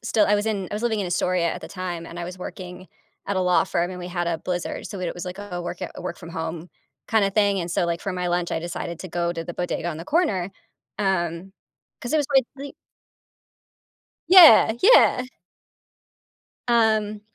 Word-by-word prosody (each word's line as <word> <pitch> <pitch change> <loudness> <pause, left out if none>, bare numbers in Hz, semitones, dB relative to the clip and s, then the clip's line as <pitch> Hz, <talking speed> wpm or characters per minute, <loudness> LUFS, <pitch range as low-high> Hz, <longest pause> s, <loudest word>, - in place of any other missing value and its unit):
still 215 -2 +2
I 210 - +3
was 205 - -2
in 200 -4 -2
I - - -4
was 215 - -4
living 225 -3 0
in 195 - -2
Astoria 175 -1 0
at - - -7
the - - -9
time, 180 -3 -5
and 170 - -9
I 175 - -4
was 180 +1 -8
working 185 0 -8 0.4
at 200 -1 -2
a - - +1
law 180 -1 +3
firm, 175 +1 -1
and 180 - -7
we 175 - -6
had 175 -1 -2
a 165 -1 -1
blizzard- 180 +1 -4
so 195 - -7
weird 180 - -2
it - - -5
was 175 - -6
like 180 +2 -7
a 200 -4 -6
work 175 - -6
at - - -7
work-from-home-kinda 175 +5 -4
thing- 200 -2 +2
and 170 - -4
so, 175 - +1
like, 170 -1 -2
for 195 - -4
my 180 -1 -2
lunch, 175 0 -1
I 160 - -1
decided 170 0 -5
to 185 - -7
go 170 0 -1
to 165 -1 -5
the 175 - -7
bodega 175 -1 -3
on 165 - -4
the 165 - -7
corner, 200 - 0 0.5
um, 185 -2 -1 0.5
'cause 240 - -5
it - - +3
was 290 - 0
quite 270 -3 +3
le 280 0 -8 1.6
Yeah. 325 - +9
Yeah. 405 - +6 1.4
Um, 220 -3 +2
180 Hz, 210 wpm, -23 LUFS, 175-210 Hz, 1.6 s, Yeah